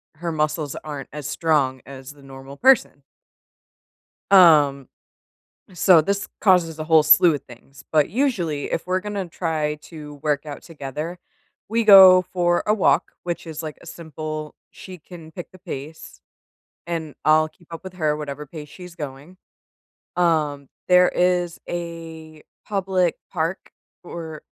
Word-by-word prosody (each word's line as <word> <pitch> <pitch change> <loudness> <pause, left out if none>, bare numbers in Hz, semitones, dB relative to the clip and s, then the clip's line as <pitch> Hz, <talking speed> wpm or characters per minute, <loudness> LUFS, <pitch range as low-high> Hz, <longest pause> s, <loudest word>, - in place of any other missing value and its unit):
her 170 +2 -4
muscles 155 -1 -2
aren't 145 -3 -7
as 150 -2 -6
strong 145 -5 0
as 135 0 -10
the 145 - -19
normal 135 +1 -12
person. 245 - +3 1.3
Um 150 -7 +6 0.9
so, 180 -1 +5
this 200 +5 -1
causes 175 -5 +2
a 155 - -4
whole 160 -1 +5
slew 165 +2 +6
of 140 - -7
things, 130 +2 -16
but 155 -2 +2
usually, 180 - -1
if 165 - -3
we're 185 +1 0
gonna 205 -2 -4
try 155 -3 -2
to 150 -3 -11
work 150 -1 -1
out 145 -2 -8
together, 155 +2 -7 0.5
we 230 +2 0
go 190 -3 +9
for 175 -1 0
a 210 - +2
walk, 215 - +2
which 175 -1 -4
is, 160 -1 -6
like, 155 -2 -7
a - - -15
simple 155 -2 -7 0.2
she 185 -1 -11
can 165 -1 -13
pick 175 - -9
the 185 - -16
pace, 160 -3 -9 0.7
and 160 -3 -4
I'll 155 0 +4
keep 175 +1 -26
up 165 - -8
with 185 -1 -10
her, 155 -4 0
or - - -1
whatever 150 0 -6
pace 150 0 -10
she's 180 +2 -12
going. 145 +2 -9 0.8
Um, 155 -5 0 0.2
there 180 0 +6
is 180 -1 0
a 165 -2 -8 0.2
public 190 -4 0 0.2
park 165 +1 -3 0.3
or, 160 -3 -8
160 Hz, 150 wpm, -22 LUFS, 150-180 Hz, 1.3 s, go